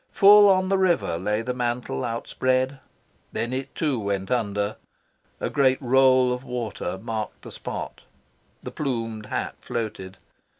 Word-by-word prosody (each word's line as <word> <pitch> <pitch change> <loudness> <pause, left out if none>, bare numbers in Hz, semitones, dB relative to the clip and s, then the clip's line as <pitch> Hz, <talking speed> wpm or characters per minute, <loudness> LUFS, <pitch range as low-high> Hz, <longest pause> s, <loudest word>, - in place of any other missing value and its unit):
Full 205 +1 +8
on 185 -1 +3
the 195 -1 +2
river 175 - +2
lay 105 +4 -1
the 125 +2 -2
mantle 125 +1 -2
outspread. 130 +3 -1 0.5
Then 120 +2 -2
it, 135 +1 -4
too, 145 -6 0
went 100 0 -2
under. 105 -3 -1 0.6
A - - -1
great 130 -2 +3
roll 130 -1 +4
of 125 +1 -5
water 115 -7 -4
marked 110 0 -5
the - - -9
spot. - - -6 0.6
The - - -6
plumed 115 -6 -3
hat - - -3
floated. 105 -5 -5
125 Hz, 140 wpm, -25 LUFS, 110-135 Hz, 0.6 s, Full